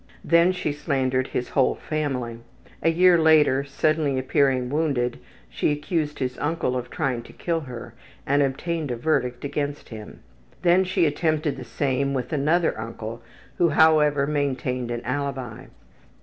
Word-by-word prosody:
Then 170 +3 +5
she 180 -4 -2
slandered 135 -3 -1
his 125 - -3
whole 135 - +2
family. 130 -7 -3 0.4
A 165 - +3
year 175 +1 +5
later, 155 -4 +4
suddenly 145 0 0
appearing 130 -1 +1
wounded, 140 -6 0 0.3
she - - 0
accused 150 0 -2
his 125 -1 -3
uncle 145 -4 -1
of 125 -1 -4
trying 125 -3 -2
to - - -14
kill 170 -1 -2
her 120 -5 -9 0.3
and 140 +1 +2
obtained 150 +3 -1
a 120 - -1
verdict 125 -1 -1
against 145 0 -3
him. 110 -2 -10 0.4
Then 180 +2 +4
she 180 -2 +1
attempted 155 0 0
the 130 - -8
same 135 +2 -1
with 130 +4 -3
another 155 +4 +2
uncle 115 0 -7 0.4
who, 170 - +4
however, 150 -2 +4
maintained 130 -4 -1
an 120 0 -3
alibi. 130 -3 -4
140 Hz, 150 wpm, -24 LUFS, 125-155 Hz, 0.4 s, Then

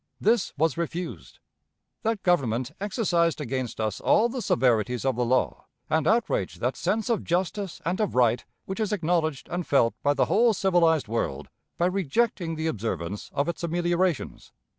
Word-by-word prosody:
This 225 -1 +2
was 160 +1 +1
refused. 170 +1 -5 0.6
That 220 -2 -1
Government 130 -7 +1
exercised 180 -6 +1
against 130 -4 -3
us 110 -2 -2
all 235 +2 +4
the 255 +1 -4
severities 125 - +1
of 135 -2 +1
the 125 - 0
law, 125 +2 0 0.2
and 160 -1 +2
outraged 240 - +1
that - - -1
sense 220 -1 -1
of 230 -4 0
justice 185 +2 -2
and 180 +4 -1
of 210 - -1
right 120 -1 +3 0.2
which 190 +3 -5
is 215 -1 0
acknowledged 165 -6 0
and 175 +1 -2
felt 120 -5 +3
by 145 0 +2
the - - +3
whole 230 0 +3
civilized 170 - +3
world 110 -11 -3 0.3
by 170 - +2
rejecting 180 - 0
the 160 0 -3
observance 100 - -3
of 140 - -1
its 170 0 -4
ameliorations. 175 -1 -1
170 Hz, 160 wpm, -26 LUFS, 130-190 Hz, 0.6 s, all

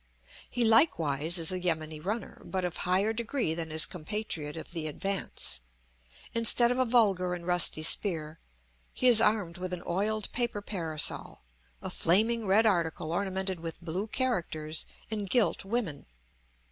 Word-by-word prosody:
He 245 -1 0
likewise 170 - +3
is 165 0 +2
a 185 - -2
yameni 160 -3 -2
runner, 210 +8 -5
but 185 -1 -3
of 175 - -4
higher 190 +5 0
degree 235 - -2
than 165 -1 -5
his 155 0 +4
compatriot 170 -4 -5
of 160 - -9
the 165 -2 -4
advance; 185 - -2 0.7
instead 230 +1 +3
of 250 - -1
a 255 - +3
vulgar 195 -7 +2
and 170 -1 -9
rusty 175 -3 +4
spear, 160 -3 0 0.6
he 255 - +1
is 235 -3 +7
armed 210 -6 +1
with 185 0 -5
an 175 - -6
oiled 210 +4 0
paper 235 -4 -2
parasol, 165 -7 +1 0.4
a - - -5
flaming 220 +5 +2
red 210 +4 +4
article 165 -5 0
ornamented 190 0 -2
with 165 0 -7
blue 180 +5 -4
characters 170 - -2 0.2
and 205 -3 -4
gilt 240 -1 +1
women. 195 -9 -3
185 Hz, 150 wpm, -29 LUFS, 165-220 Hz, 0.7 s, is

